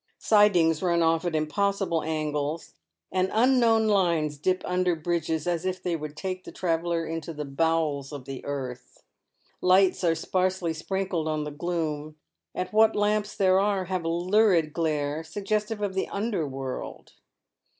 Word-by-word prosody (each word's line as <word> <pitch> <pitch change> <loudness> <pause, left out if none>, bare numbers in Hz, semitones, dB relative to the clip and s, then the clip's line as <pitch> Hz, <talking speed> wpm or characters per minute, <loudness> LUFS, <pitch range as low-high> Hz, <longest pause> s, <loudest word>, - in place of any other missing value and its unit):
Sidings 180 -7 +4
run 170 -2 +2
off 165 +1 +2
at 170 -2 -1
impossible 185 +2 0
angles, 155 0 -3 0.4
and 185 0 +1
unknown 230 -1 +4
lines 170 -8 +1
dip 185 +4 0
under 180 -1 +1
bridges 160 -1 -2
as 175 -1 -1
if 185 0 -3
they 175 -2 0
would 150 -1 -7
take 185 -1 -4
the - - -9
traveller 170 -1 -1
into 165 0 -5
the 150 0 -4
bowels 150 -1 0
of 140 -3 -8
the 135 -1 -7
earth. 130 -3 -6 0.6
Lights 185 +1 +4
are 165 -2 +3
sparsely 185 0 -1
sprinkled 180 0 -2
on 155 -1 -1
the 150 - -5
gloom, 155 -1 -3 0.4
and 185 - -2
what 220 +2 +4
lamps 210 0 0
there 190 -1 +4
are 200 -2 +1
have 185 -1 -2
a 165 - -1
lurid 175 -2 +2
glare, 155 -2 -1
suggestive 210 +4 -2
of 200 -2 -1
the 190 - -2
under 200 -6 -2
world. 135 -1 -6
170 Hz, 155 wpm, -26 LUFS, 155-190 Hz, 0.6 s, Sidings